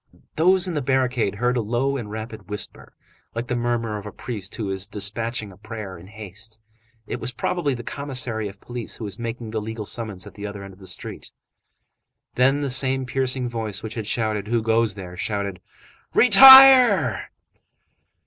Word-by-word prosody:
Those 185 +3 +3
in 180 - -3
the 150 - -1
barricade 125 -6 0
heard 125 +4 0
a 120 - +1
low 120 +5 -1
and 120 -6 -5
rapid 110 0 -8
whisper, 105 0 -6 0.4
like 115 +1 -3
the 125 - -3
murmur 120 -3 -2
of 105 - -10
a - - -7
priest 105 -6 -7
who 105 -4 -4
is 95 0 -5
despatching 110 +1 -3
a 90 - -16
prayer 105 -2 -8
in 85 +1 -13
haste. 105 +1 -10 0.5
It - - -5
was - - -3
probably 145 -1 -2
the 120 - -8
commissary 125 -6 -3
of 100 0 -11
police 120 -2 -5
who - - -8
was 100 0 -6
making 115 -1 -5
the 110 -1 -2
legal 110 0 -6
summons 105 -4 -4
at 100 - -12
the 105 0 -7
other 100 -1 -8
end 100 -1 -10
of 95 - -19
the 95 - -11
street. - - -6 1.0
Then 135 +3 +2
the 140 -2 -2
same 130 0 +2
piercing 130 0 -1
voice 110 -4 -5
which 110 -1 -6
had 110 -3 -5
shouted: 110 -3 -1
"Who 115 0 0
goes 115 -2 +1
there?" 90 -3 -9
shouted:— 100 -1 -3 0.5
"Retire!" 250 - +8
115 Hz, 185 wpm, -23 LUFS, 105-125 Hz, 1.0 s, Retire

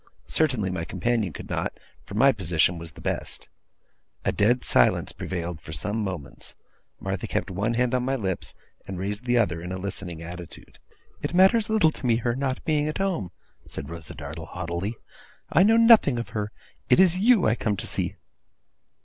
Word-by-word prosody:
Certainly, 125 -12 +1
my 90 -3 -2
companion 105 +2 0
could - - -9
not, - - -3 0.3
for 100 - -7
my 135 +5 +6
position 85 -3 +1
was 80 -2 -8
the - - -13
best. - - -3 0.8
A - - +3
dead 120 +5 +2
silence - - +3
prevailed 85 -3 -4
for 80 - -9
some 105 +8 -2
moments. 75 -7 -5 0.4
Martha - - -3
kept - - -2
one 105 +6 -1
hand 125 +1 +1
on 125 - +2
my 135 +2 0
lips, 95 -7 -2 0.3
and 95 - -5
raised 100 +5 -3
the 120 0 +2
other 85 -8 +1
in 90 +1 -6
a 95 - -3
listening 90 -3 -4
attitude. 85 0 -10 0.4
'It - - -3
matters 195 +4 +5
little 215 -8 +4
to 140 - -8
me 115 - +4
her 120 +1 0
not 130 -1 -2
being 150 -1 +1
at 155 - -2
home,' 190 - -1 0.4
said 70 +4 -7
Rosa 85 -2 -7
Dartle 75 +2 -7
haughtily, 90 +5 -4 0.6
'I 165 - +5
know 220 +4 +6
nothing 230 - +7
of 120 - -4
her. 105 -1 -3 0.4
It - - +6
is 185 -1 +5
you 225 -2 +5
I 110 - +4
come 105 -3 -1
to - - -4
see. - - -2
105 Hz, 185 wpm, -26 LUFS, 90-135 Hz, 0.8 s, nothing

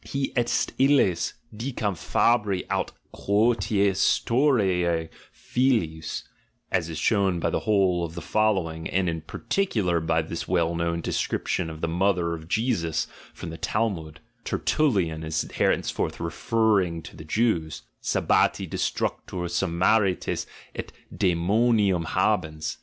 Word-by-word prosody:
Hie 140 -1 -2
est 120 -1 +1
illes, 130 -11 +3 0.2
dicam 110 -4 -2
fabri 105 +1 +1
aut - - 0 0.2
qiKCstuario 100 - +2 0.2
films" 85 -12 -1 0.5
(as 85 -3 0
is 80 - -5
shown 95 -2 +2
by - - 0
the - - 0
whole 95 -5 +2
of 85 0 -5
the 85 - -5
following, 85 -5 0
and 95 0 +1
in 80 -1 -2
par 80 - -10
ticular 105 - +1
by 80 0 +1
this 85 +1 -5
well 85 -2 +1
known 85 0 -1
description 80 - -1
of 80 0 -9
the 85 - 0
mother 90 0 +1
of 80 -1 -7
Jesus 85 - 0 0.3
from - - -8
the 80 - -8
Talmud, 85 -9 -2 0.2
Tertullian 95 - 0
is 80 0 -1
henceforth - - 0
refer 110 +6 +1
ring 85 -4 -1
to - - -11
the - - -9
Jews), 80 -3 0 0.2
"sabbati - - +2
destructor, 90 -2 -2
Samarites 90 +3 +1 0.3
et - - -6 0.2
decmoniurn 95 +1 +2
habeus. 85 -5 0
90 Hz, 125 wpm, -25 LUFS, 85-110 Hz, 0.5 s, illes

